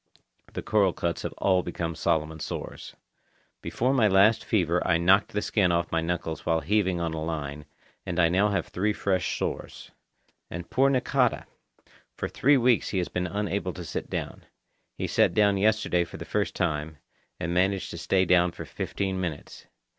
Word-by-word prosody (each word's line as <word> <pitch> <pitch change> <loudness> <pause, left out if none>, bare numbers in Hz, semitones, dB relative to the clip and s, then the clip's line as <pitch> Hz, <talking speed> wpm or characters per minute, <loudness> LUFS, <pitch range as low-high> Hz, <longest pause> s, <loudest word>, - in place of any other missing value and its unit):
The - - -5
coral 100 -4 +2
cuts 85 -1 -2
have - - -4
all 95 -2 +2
become 85 -1 -4
Solomon 80 0 -1
sores. - - -6 0.7
Before 125 +3 0
my 120 -5 +4
last 100 +3 +4
fever 90 -4 +1
I 85 - +2
knocked 95 +4 +4
the 105 - -1
skin 95 -5 +2
off 85 0 0
my 80 - +1
knuckles 80 -2 -3
while 80 -1 +1
heaving 95 +1 +1
on 85 -1 -2
a 80 -1 -3
line, 75 -2 -4 0.4
and 90 -1 -3
I 85 - +5
now 95 +5 +2
have 100 - -1
three 105 +3 0
fresh 95 -3 -1
sores. - - -5 0.6
And 85 +1 -6
poor 135 +1 +4
Nakata! 130 -1 +1 0.7
For - - -3
three 140 +2 +3
weeks 125 -2 +3
he 95 - -2
has 90 - -1
been 90 0 -2
unable 100 -1 -2
to 90 - -8
sit - - -5
down. - - -5 0.5
He - - -2
sat - - +2
down 100 -2 +4
yesterday 105 -4 +2
for - - -9
the - - -7
first - - -1
time, 75 0 -2 0.4
and 85 - -2
managed 95 +2 +1
to - - -7
stay 95 -1 +2
down 90 -1 +3
for - - -8
fifteen 95 -1 -3
minutes. 80 -5 -6
90 Hz, 180 wpm, -27 LUFS, 85-100 Hz, 0.7 s, I